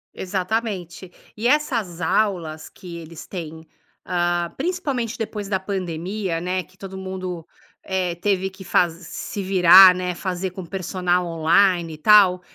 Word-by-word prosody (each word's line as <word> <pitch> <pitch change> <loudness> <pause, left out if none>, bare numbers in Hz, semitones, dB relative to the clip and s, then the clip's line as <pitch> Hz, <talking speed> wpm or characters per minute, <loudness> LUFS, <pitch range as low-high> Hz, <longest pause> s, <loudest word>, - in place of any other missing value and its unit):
Exatamente. 190 -2 -3 0.2
E 215 - -6
essas 240 - +1
aulas 175 -4 -1
que 175 -2 -11
eles 165 -1 -10
têm, 160 -3 -8 0.4
ah, 175 -1 0
principalmente 280 -8 -2
depois 210 -3 -5
da 190 -2 0
pandemia, 185 -1 -3
né, 180 +2 -2
que 185 +3 -25
todo 190 0 -8
mundo, 185 -3 -6 0.4
eh, 185 -2 -2
teve 190 +1 0
que 190 0 -13
faz 175 -2 +2
se 180 +4 -7
virar, 185 0 +8
né, 180 -1 -3
fazer 185 0 -3
com 185 0 -8
personal 180 0 -1
online 170 +1 +2
e - - -14
tal, 190 0 +5
185 Hz, 140 wpm, -22 LUFS, 175-195 Hz, 0.4 s, virar